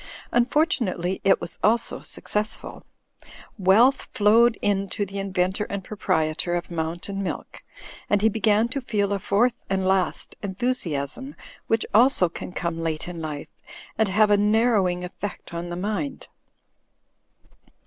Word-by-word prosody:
Unfortunately 240 - +1
it 195 -1 +4
was - - -6
also 230 +2 +1
successful: 210 +1 -4 0.8
wealth 225 +9 +4
flowed 225 +2 +5
in 200 -1 0
to 205 - -1
the 200 +1 -6
inventor 190 +1 0
and 200 -1 -5
proprietor 165 -4 -1
of 175 0 -4
Mountain 170 +4 -3
Milk, 195 - -5 0.5
and 205 0 +2
he - - +6
began 220 0 +2
to 275 +3 -3
feel 205 -4 0
a 200 - -1
fourth 225 +6 +1
and 190 -1 0
last 190 -1 0
enthusiasm, 200 - -2 0.3
which, 225 0 +1
also, 225 -5 +5
can 170 - -7
come 170 -2 -3
late 160 -1 -3
in 175 -2 -6
life 150 -2 -5 0.5
and 220 -2 +1
have 210 +2 +4
a 205 - +6
narrowing 205 -4 +2
effect 180 0 -7
on 170 +1 -4
the 175 - -4
mind. 180 -5 -3
200 Hz, 140 wpm, -24 LUFS, 180-220 Hz, 0.8 s, he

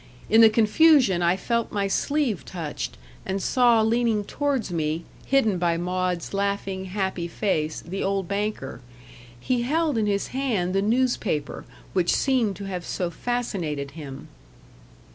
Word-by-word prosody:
In 225 +1 +7
the 225 - +9
confusion 225 - +4
I 175 +2 +3
felt 235 +3 -1
my 200 -1 0
sleeve 270 - 0
touched, 150 - -5 0.3
and 190 +1 -2
saw 235 +2 +4
leaning 225 -1 +1
towards 270 -2 -2
me, 160 0 -1 0.2
hidden 225 -9 +2
by 170 -1 +1
Maud's 180 0 -2
laughing 200 -1 -2
happy 190 -2 -2
face, 160 -4 -1
the 185 +4 -5
old 195 -2 -1
banker. 200 - -3 0.6
He 245 - 0
held 300 0 +1
in 210 - +1
his 200 -1 -1
hand 230 -10 -1
the 195 - +2
newspaper 220 - 0 0.3
which 180 -2 +2
seemed 245 -7 +1
to 200 - -8
have 185 -3 -4
so 175 0 -3
fascinated 175 - -3
him. 140 -3 -9
200 Hz, 145 wpm, -25 LUFS, 175-235 Hz, 0.6 s, the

